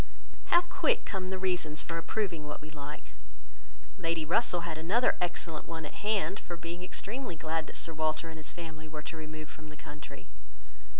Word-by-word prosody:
How 345 - +8
quick 465 +7 +3
come 185 -2 -1
the 190 - 0
reasons 180 -5 +2
for 165 -1 -1
approving 170 -5 0
what 150 - -4
we 155 +1 -9
like! 150 0 -7 0.9
Lady 165 -2 +1
Russell 175 +1 +4
had 170 -1 -2
another 210 +10 +5
excellent 170 -2 0
one 165 -1 -3
at - - -6
hand, 205 -1 +3
for 175 - -5
being 170 +1 -4
extremely 210 +3 -3
glad 160 0 0
that - - -1
Sir 165 - +1
Walter 155 +1 +1
and 160 -1 -6
his 155 - -1
family 160 -2 -6
were 155 -1 -5
to 165 - -4
remove 155 -1 -5
from 155 -1 -10
the 150 - -10
country. 150 +1 -8
165 Hz, 185 wpm, -33 LUFS, 155-185 Hz, 0.9 s, How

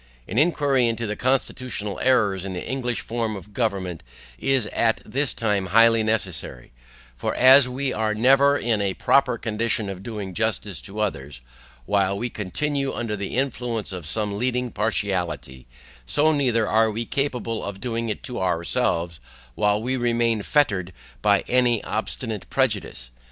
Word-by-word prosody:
An 110 - 0
inquiry 145 -6 +3
into 115 0 -1
the 105 0 -3
CONSTITUTIONAL 125 -4 -1
ERRORS 110 -8 +2
in 95 -1 -5
the 90 - -5
English 125 -2 -2
form 115 -2 -2
of 100 +1 -11
government 95 -8 -2 0.4
is 135 - +2
at 115 -1 +2
this 140 +1 0
time 105 -4 -1
highly 115 +3 +5
necessary; 95 - -2 0.4
for - - -3
as 130 +1 +7
we 130 +1 -2
are 110 -1 0
never 135 +5 +5
in 115 -5 0
a 95 -2 -1
proper 130 -3 +3
condition 110 -1 -1
of 95 -1 -8
doing 100 -3 -6
justice 105 -5 -2
to 105 +1 -8
others, 70 -10 -3 0.4
while 100 +2 +1
we 120 +3 -3
continue 140 +7 -2
under 115 -3 -3
the 100 -1 -5
influence 120 -5 -2
of 90 -5 -6
some 105 +2 -2
leading 125 0 0
partiality, 95 - -2 0.4
so 155 - +3
neither 125 -7 +1
are 110 +1 +3
we 115 +2 -3
capable 125 -5 -2
of 100 -1 -6
doing 115 +1 -2
it 105 - -4
to 125 - -5
ourselves 85 -1 -1 0.3
while 105 +8 +1
we 130 +4 -1
remain 115 -2 +1
fettered 100 - +1 0.3
by 100 -1 +4
any 120 -3 +2
obstinate 110 0 -3
prejudice. 105 - -1
110 Hz, 155 wpm, -23 LUFS, 100-125 Hz, 0.4 s, as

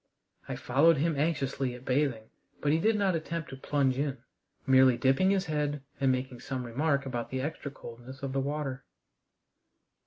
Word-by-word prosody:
I - - -2
followed 150 +6 +4
him 160 +2 +1
anxiously 140 -4 -1
at 125 +1 -12
bathing, 130 -4 +1 0.4
but 145 - +1
he 160 - +3
did 220 +6 +3
not 200 -3 +2
attempt 165 0 -3
to - - -6
plunge 135 -1 0
in, 140 -2 -1 0.5
merely 130 -2 +6
dipping 135 +9 +3
his 195 -1 +2
head 150 -3 -1 0.2
and 135 -1 +3
making 130 -1 -3
some 130 -1 -4
remark 140 +4 0
about 120 -3 -3
the 130 - -2
extra 150 0 -4
coldness 130 0 -11
of 135 -1 -3
the 135 - +1
water. 140 -1 -3
135 Hz, 175 wpm, -30 LUFS, 130-150 Hz, 0.5 s, merely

